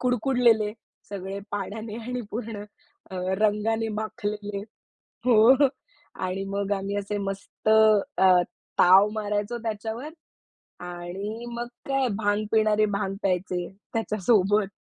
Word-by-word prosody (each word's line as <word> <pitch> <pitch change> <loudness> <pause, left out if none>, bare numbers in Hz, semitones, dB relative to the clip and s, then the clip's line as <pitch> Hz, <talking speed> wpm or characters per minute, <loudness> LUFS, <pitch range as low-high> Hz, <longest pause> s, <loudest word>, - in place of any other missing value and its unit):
कुडकुडलेले 245 -3 +3 0.4
सगळे 195 0 -5
पाण्याने 210 +2 -5
आणि 250 0 -3
पूर्ण 215 -2 -5 0.5
अ, 190 - -7 0.2
रंगाने 215 +1 +1
माखलेले 210 -2 -4 0.7
हो 250 +4 +6 0.6
आणि 185 +1 -2
मग 200 0 -2
आम्ही 200 0 -2
असे 205 +1 -2
मस्त 200 +1 -5
अ, 215 -3 +5 0.5
ताव 190 +3 +7
मारायचो 210 +2 -2
त्याच्यावर 225 +4 -4 0.8
आणि 185 +6 -6
मग 235 0 -4 0.2
काय? 270 -1 +2
भांग 205 0 0
पिणारे 215 -1 +4
भांग 200 -1 -2
प्यायचे 180 -2 -1 0.3
त्याच्यासोबत. 210 -2 +2
210 Hz, 105 wpm, -26 LUFS, 200-225 Hz, 0.8 s, ताव